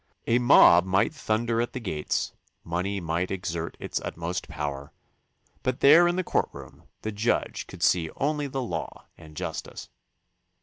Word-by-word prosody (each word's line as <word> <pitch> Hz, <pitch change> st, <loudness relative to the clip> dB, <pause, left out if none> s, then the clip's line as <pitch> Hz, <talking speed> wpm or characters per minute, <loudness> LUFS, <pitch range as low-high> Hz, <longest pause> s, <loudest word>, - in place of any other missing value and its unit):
A 120 Hz, +2 st, +3 dB
mob 105 Hz, -8 st, +7 dB
might 95 Hz, -, +1 dB
thunder 115 Hz, -4 st, 0 dB
at 120 Hz, -, -3 dB
the 130 Hz, -, -4 dB
gates, 80 Hz, -10 st, -2 dB, 0.3 s
money 90 Hz, +4 st, -2 dB
might 85 Hz, +1 st, -2 dB
exert 85 Hz, -3 st, -4 dB
its -, -, -3 dB
utmost 85 Hz, +3 st, -4 dB
power, 75 Hz, -3 st, -5 dB, 0.7 s
but 130 Hz, -1 st, -1 dB
there 160 Hz, +5 st, +7 dB
in 175 Hz, -, +1 dB
the 185 Hz, -, 0 dB
courtroom -, -, -3 dB, 0.2 s
the 110 Hz, -, -2 dB
judge 105 Hz, +3 st, -1 dB
could -, -, -8 dB
see 85 Hz, -3 st, +3 dB
only 145 Hz, +1 st, -1 dB
the 135 Hz, -1 st, -3 dB
law 85 Hz, -9 st, -5 dB
and 80 Hz, -2 st, -15 dB
justice. -, -, -6 dB
100 Hz, 150 wpm, -26 LUFS, 85-125 Hz, 0.7 s, mob